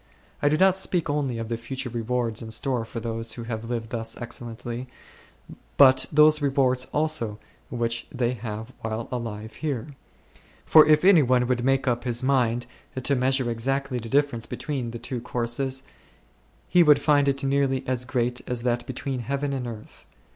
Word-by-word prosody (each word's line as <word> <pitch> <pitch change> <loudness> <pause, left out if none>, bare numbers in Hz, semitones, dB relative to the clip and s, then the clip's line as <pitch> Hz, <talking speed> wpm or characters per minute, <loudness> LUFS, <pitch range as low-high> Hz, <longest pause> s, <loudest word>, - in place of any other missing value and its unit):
I 145 - +4
do 155 - +2
not 190 +1 +4
speak 175 -5 +1
only 140 -5 -1
of 115 -1 -4
the 115 0 -2
future 125 +3 -5
rewards 120 -1 -1
in 115 - -7
store 120 +1 -1
for 115 - -6
those 115 0 -3
who 120 - -7
have 115 0 -5
lived 115 -2 -4
thus 115 -1 -4
excellently, 120 +1 -6 0.9
but 130 -2 +6
those 150 0 +5
rewards 130 -2 +2
also 150 -9 -1 0.3
which 115 -1 -2
they 125 -1 0
have 110 +1 -6
while 110 +1 -4
alive 110 -3 -5
here; 140 -7 -2 0.8
for 155 -1 +7
if 155 +2 +4
any 190 -5 +7
one 125 -2 +3
would 125 -1 0
make 135 +1 +1
up 120 -1 +1
his 120 0 -2
mind 125 -3 +1 0.4
to 140 - +2
measure 130 -1 +1
exactly 130 +2 -1
the 115 0 -8
differ 140 -2 +2
ence 115 - -8
between 135 -6 -4
the 120 - -6
two 120 +1 -5
courses, 125 +3 -2 0.8
he 180 - +5
would 150 -3 +7
find 145 -1 +3
it 140 0 0
well 140 0 +2
nigh 130 0 -2
as 125 -1 -1
great 125 -1 -1
as 125 -1 -2
that 120 -1 -1
between 130 0 -4
heaven 140 +4 -2
and 130 -3 -3
earth. 110 -2 -10
125 Hz, 180 wpm, -25 LUFS, 115-140 Hz, 0.9 s, for